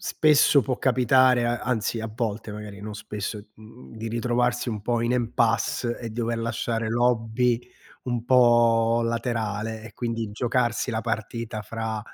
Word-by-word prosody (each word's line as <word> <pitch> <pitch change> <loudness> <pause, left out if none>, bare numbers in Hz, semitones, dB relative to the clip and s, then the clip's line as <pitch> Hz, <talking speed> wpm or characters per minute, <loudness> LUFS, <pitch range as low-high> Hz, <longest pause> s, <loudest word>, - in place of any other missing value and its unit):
Spesso 150 -2 +4
può 125 +3 -2
capitare, 130 -1 +4
a 120 0 0
anzi, 115 -2 -1
a 110 0 -5
volte, 110 -2 -3
magari, 105 -1 -8
non 105 0 -7
spesso, 105 0 -5 0.2
mhmm, 110 - -14
di 115 +1 -5
ritrovarsi 120 +2 0
un 105 -2 -4
po' 120 +2 0
in 120 - 0
impasse 120 0 0
e 115 -2 -6
dover 115 +1 -2
lasciare 115 -1 -2
l'hobby 120 0 +1 0.4
un 120 -2 -2
po' 120 -2 +4
laterale 115 -2 -2
e, 115 - -11
quindi, 115 -3 -3
giocarsi 120 +2 0
la 110 -1 -1
partita 115 0 -3
fra, 110 0 -4
115 Hz, 150 wpm, -25 LUFS, 110-120 Hz, 0.4 s, Spesso